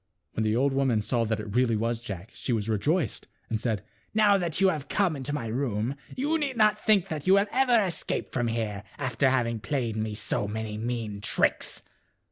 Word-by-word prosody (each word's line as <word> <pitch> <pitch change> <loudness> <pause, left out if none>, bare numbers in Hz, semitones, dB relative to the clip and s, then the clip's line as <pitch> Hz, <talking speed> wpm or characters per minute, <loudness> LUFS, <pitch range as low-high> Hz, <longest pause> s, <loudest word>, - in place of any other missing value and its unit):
When 110 - -1
the 110 0 +1
old 135 +3 +2
woman 130 -6 +2
saw 115 +1 +1
that 110 0 -1
it 105 0 -6
really 125 -2 +3
was 115 +2 0
Jack 105 -2 -7
she - - -4
was 110 -3 0
rejoiced 145 - 0 0.2
and 110 -1 -1
said, 110 -5 -1 0.2
" - - -38
Now 210 -2 +6
that 175 -4 -1
you 195 -1 +5
have 150 -5 -3
come 190 -5 +2
into 140 +1 -4
my 145 -5 -2
room 115 0 -1 0.2
you 300 +5 +1
need 275 -5 -2
not 215 -1 +3
think 205 -5 +4
that 155 +1 -4
you 190 - +7
will 200 +1 +4
ever 250 -3 +4
escape 185 -6 -2
from 120 -2 0
here, 110 -3 -2 0.2
after 130 -1 +1
having 120 -3 +1
played 120 -2 -2
me 110 -1 -2
so 105 0 -1
many 110 0 -4
mean 110 -2 -3
tricks." - - 0
120 Hz, 210 wpm, -27 LUFS, 110-165 Hz, 0.2 s, you